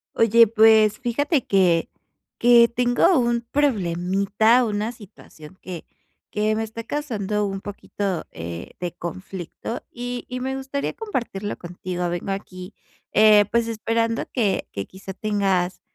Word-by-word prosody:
Oye, 230 0 +6
pues, 220 -1 +5
fíjate 270 +3 0
que 180 -4 +2 0.5
que 235 -1 +7
tengo 245 +9 +3
un 235 -1 +1
problemita, 200 -2 +2
una 210 +1 -2
situación 185 -6 -15
que 180 -3 -8 0.4
que 215 +1 0
me 220 - -1
está 225 +1 -7
causando 215 -7 -2
un 195 -1 -4
poquito, 200 -2 -4
eh, 85 +1 -7
de 175 -1 -3
conflicto 185 +5 -6
y 245 0 -5
y 250 +1 -5
me 265 +1 -3
gustaría 270 +1 -3
compartirlo 235 - -4
contigo. 180 0 -4
Vengo 175 +3 -3
aquí, 185 0 -7 0.4
eh, 210 -1 +6
pues 235 0 +2
esperando 230 +1 -1
que 215 -7 0
que 100 - -4
quizá 190 0 -10
tengas 195 -3 0
215 Hz, 130 wpm, -23 LUFS, 190-235 Hz, 0.5 s, que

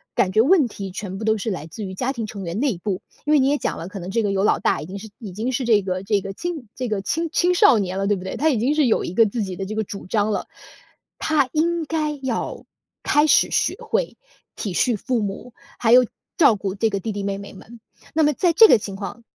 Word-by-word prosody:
感 185 - +2
觉 215 - +5
问 295 0 +4
题 195 -3 -7
全 190 0 -6
部 215 - -6
都 220 0 +2
是 220 - -3
来 175 -6 -4
自 210 +7 -8
于 190 0 -7
家 255 +7 -1
庭 230 -4 -4
成 200 -2 -7
员 170 +4 -4
内 260 -8 0
部， 185 +1 -3 0.2
因 300 - 0
为 300 - +6
你 265 - +3
也 290 +1 +2
讲 - - -3
了， 165 - -6
可 195 - -8
能 180 +2 -6
这 230 - +1
个 200 - 0
有 195 0 +1
老 - - +3
大， - - +1
已 - - -6
经 195 +4 -7
是 220 - -10
已 210 -5 -8
经 220 +7 -3
是 265 +1 -1
这 220 -3 +4
个 185 0 -3
这 205 +1 +1
个 195 +1 -6
青 320 - -5
这 255 -1 -3
个 210 -2 -1
青 325 - -1
青 360 +1 +2
少 345 - +6
年 185 -1 -2
了， 195 - -1
对 205 - +2
不 180 - -8
对？ 190 - -4
他 315 +2 +2
已 265 - +1
经 265 +7 +1
是 305 -2 +3
有 220 - +2
一 - - -5
个 225 - +6
自 220 +2 -2
己 190 -3 -4
的 195 - -4
这 215 - -5
个 220 - -1
主 200 -1 -8
张 210 +2 0
了， - - -2 0.7
他 290 -5 +1
应 335 +2 0
该 305 -1 -1
要 255 -4 -3 0.4
开 295 +1 +3
始 310 - +4
学 - - +1
会 465 +2 -2 0.4
体 200 -5 -4
恤 245 +4 +2
父 245 +4 -1
母， 205 +4 -5 0.3
还 225 - +2
有 250 +1 +7 0.3
照 280 -10 +6
顾 195 -1 -4
这 220 +2 +1
个 200 - -1
弟 220 +3 -4
弟 200 -1 -4
妹 195 0 -2
妹 200 - -10
们。 230 +4 -13 0.3
那 320 - +2
么 300 -1 +3
在 345 +5 +2
这 445 +6 +9
个 - - +6
情 200 -2 -7
况， 200 +4 -7
220 Hz, 295 characters per minute, -22 LUFS, 195-275 Hz, 0.7 s, 这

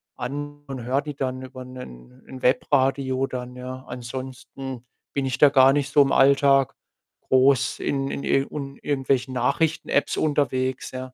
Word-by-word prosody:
an 145 +3 -6
und 130 -3 -6
höre 130 +4 0
die 150 -1 -7
dann 130 -1 -3
über 130 0 -9
'nen 65 - -12
'n 130 -1 -10
Webradio 135 0 +2
dann, 125 0 -6
ja. 130 +1 -7
Ansonsten 130 +1 -7 0.3
bin 140 -1 -1
ich 130 -1 -2
da 145 - +8
gar 135 -1 +6
nicht 145 -2 -1
so 145 - +6
im 135 - -1
Alltag 135 -1 +4 0.5
groß 130 -1 +3
in 135 -1 -1
in - - -4
ir 135 0 +1
und 140 -2 -6
irgendwelchen 135 -2 0
Nachrichten-Apps 145 +4 0
unterwegs, 130 -4 0
ja. 130 - -5
130 Hz, 155 wpm, -24 LUFS, 130-140 Hz, 0.5 s, da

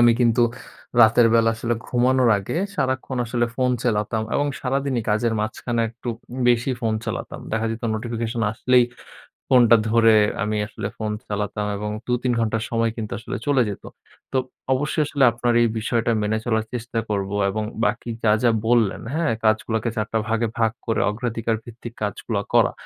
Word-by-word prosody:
আমি 120 0 +7
কিন্তু 120 0 +4 0.6
রাতের 110 +2 +6
বেলা 115 0 +4
আসলে 115 +1 -1
ঘুমানোর 125 0 +3
আগে 95 +9 -4 0.2
সারাক্ষণ 130 -4 -1
আসলে 120 +1 0
ফোন 130 -1 +2
চালাতাম 110 -1 0
এবং 145 - +2
সারাদিনই 135 -2 -1
কাজের 110 +2 +1
মাঝখানে 115 +2 -2
একটু 120 +2 -9 0.4
বেশি 120 +2 +2
ফোন 110 -3 0
চালাতাম। - - -5
দেখা 110 0 0
যেত 115 +2 -5
নোটিফিকেশন 115 +1 -3
আসলেই 125 +2 +3 0.6
ফোনটা 120 -3 +6
ধরে 115 -1 +5 0.3
আমি 105 +1 -1
আসলে 105 -1 -5
ফোন 110 -1 -3 0.2
চালাতাম 105 0 -2
এবং 105 +1 -4 0.2
দু, 125 - -1
৩ 125 - +1
ঘন্টা 115 0 0
সময় 115 -1 +1
কিন্তু 110 -2 -5
আসলে 115 - -5
চলে 140 -3 +4
যেত। 100 - -7 0.5
তো - - 0 0.4
অবশ্যই 150 +3 0
আসলে 140 -2 +2
আপনার 120 +1 0
এই 120 - +3
বিষয়টা 115 +1 0
মেনে 105 +1 0
চলার 110 -2 +1
চেষ্টা 120 -1 -3
করব 100 -2 -1 0.2
এবং 110 +2 -2 0.2
বাকি 120 -1 -1
যা, 105 - +4
যা 120 - +5 0.2
বললেন, 115 -3 +2
হ্যাঁ 165 -6 +1
কাজগুলাকে 110 +1 +1
৪ 110 -1 0
টা 110 - +2
ভাগে 115 +1 +1
ভাগ 115 -1 +3 0.2
করে 115 -2 0
অগ্রাধিকার 115 0 -2
ভিত্তিক 120 0 -10
কাজগুলা 105 +1 -2
করা। - - +5
115 Hz, 170 wpm, -23 LUFS, 110-120 Hz, 0.6 s, আমি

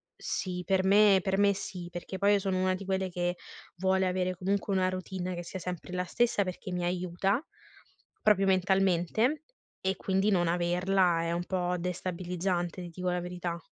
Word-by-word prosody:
sì, 180 -1 -3
per 190 -1 +2
me, 200 0 +6
per 190 0 0
me 200 0 +4
sì, 180 -3 -6
perché 175 +2 -6
poi 200 0 +4
io 205 - +4
sono 190 -1 -1
una 185 0 +2
di 190 - -7
quelle 190 0 -1
che 175 0 -1 0.4
vuole 190 +1 +2
avere 185 0 0
comunque 195 +2 -1
una 185 -1 +2
routine 185 0 -4
che 175 - -5
sia 190 +2 -6
sempre 180 0 -6
la 180 0 -1
stessa 230 +2 +2
perché 185 0 -6
mi 180 0 -2
aiuta, 180 - 0 0.8
proprio 195 -2 +4
mentalmente, 190 - +2 0.4
e 190 0 0
quindi 195 +2 +1
non 175 -3 +2
averla 175 +1 +2
è 170 - -1
un 175 +1 -2
po' 180 -1 -1
destabilizzante, 180 0 -2
ti 175 - -7
dico 180 +2 -3
la 180 0 -1
verità. 175 -1 -5
185 Hz, 180 wpm, -30 LUFS, 175-195 Hz, 0.8 s, me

